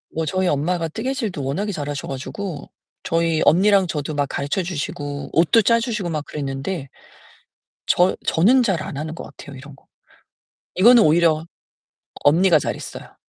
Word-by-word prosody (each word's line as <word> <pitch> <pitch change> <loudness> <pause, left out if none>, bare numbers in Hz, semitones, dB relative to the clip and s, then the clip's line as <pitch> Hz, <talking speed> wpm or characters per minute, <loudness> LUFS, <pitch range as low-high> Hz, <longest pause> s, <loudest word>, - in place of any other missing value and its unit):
뭐 160 - -1
저희 185 +4 0
엄마가 165 +3 0
뜨개질도 220 - -3
워낙에 190 +11 -2
잘하셔 145 -5 -5
가지고 145 +4 -6 0.3
저희 165 -1 0
언니랑 195 +3 +4
저도 150 -2 -4
막 145 -1 0
가르쳐 145 +7 -2
주시고 145 -4 -5
옷도 170 +8 +4
짜주시고 230 -3 0
막 155 -3 -3
그랬는데. 140 +2 -5 1.0
저 180 +1 +3
저는 240 +10 +4
잘 190 -8 0
안 140 - -6
하는 155 +2 -4
것 170 - -8
같아요, 145 -1 -12
이런 135 +2 -12
거. - - -25 0.9
이거는 230 +5 +7
오히려 160 -1 +3 0.8
언니가 170 +3 +5
잘 145 - -2
했어요. - - -10
165 Hz, 320 characters per minute, -21 LUFS, 145-190 Hz, 1.0 s, 이거는